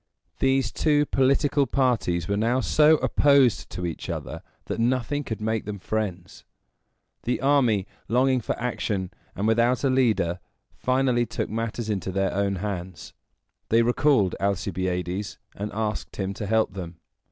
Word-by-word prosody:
These 135 -3 +2
two 150 -2 +2
political 140 +1 +2
parties 115 -11 0
were 100 - 0
now 115 +5 +1
so 155 +3 +4
opposed 130 - +3
to 90 - -5
each 85 - -5
other, - - -5 0.2
that - - -4
nothing 130 +4 0
could 110 -5 -5
make 110 0 -1
them 105 0 -5
friends. 95 -3 -4 0.8
The 125 - -1
army, 130 -8 +3 0.2
longing 130 +2 +2
for - - -3
action, 105 -6 -2 0.2
and 100 +3 -1
without 120 +3 +2
a 135 - +3
leader, 110 -9 +1 0.3
finally 125 -2 +1
took 115 - -3
matters 115 0 -3
into 100 -3 -2
their 95 +1 0
own 100 0 0
hands. 95 -3 -5 0.6
They 115 +1 +4
recalled 120 -5 +3
Alcibiades, 95 -1 -2 0.2
and 105 +1 -4
asked 110 0 -3
him 95 0 -3
to 100 +1 -5
help 110 -1 +1
them. 90 -3 -7
110 Hz, 145 wpm, -25 LUFS, 95-130 Hz, 0.8 s, so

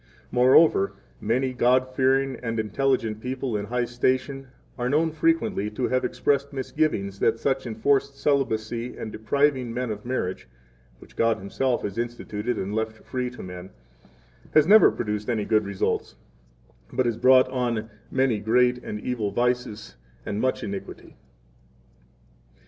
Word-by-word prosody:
[Moreover, 125 -3 +5 0.3
many 130 +4 0
God 125 +1 +3
fearing 135 +1 +2
and 115 -2 -2
intelligent 110 0 0
people 130 -1 -3
in 100 0 -2
high 120 +3 -1
station 130 +3 -1 0.3
are 125 0 -2
known 160 +4 +2
frequently 220 - +1
to 115 +4 -2
have 130 0 +1
expressed 140 0 0
misgivings 130 -8 -1
that - - +2
such 135 +1 -1
enforced 140 +5 0
celibacy 120 -4 -1
and 110 - -6
depriving 130 +2 +1
men 125 0 -2
of 105 -1 -6
marriage 120 - -3 0.5
(which - - -17
God 115 0 +2
Himself 120 +6 -1
has 100 +2 -4
instituted 120 -1 -3
and 100 +2 -3
left 110 0 -3
free 125 -1 -3
to 125 - -10
men) 90 0 -8 0.9
has 155 -1 +7
never 210 +5 +8
produced 105 -1 -3
any 110 -4 0
good 110 -2 +2
results, 100 -1 -2 0.8
but 130 0 0
has 115 -2 0
brought 130 +1 +6
on 120 -4 -2 0.2
many 130 -5 +1
great 125 +3 +2
and 105 - -5
evil 115 -5 -2
vices 120 -1 -2 0.3
and 105 +2 -2
much 130 0 0
iniquity. 100 -2 -7
125 Hz, 145 wpm, -25 LUFS, 110-130 Hz, 0.9 s, never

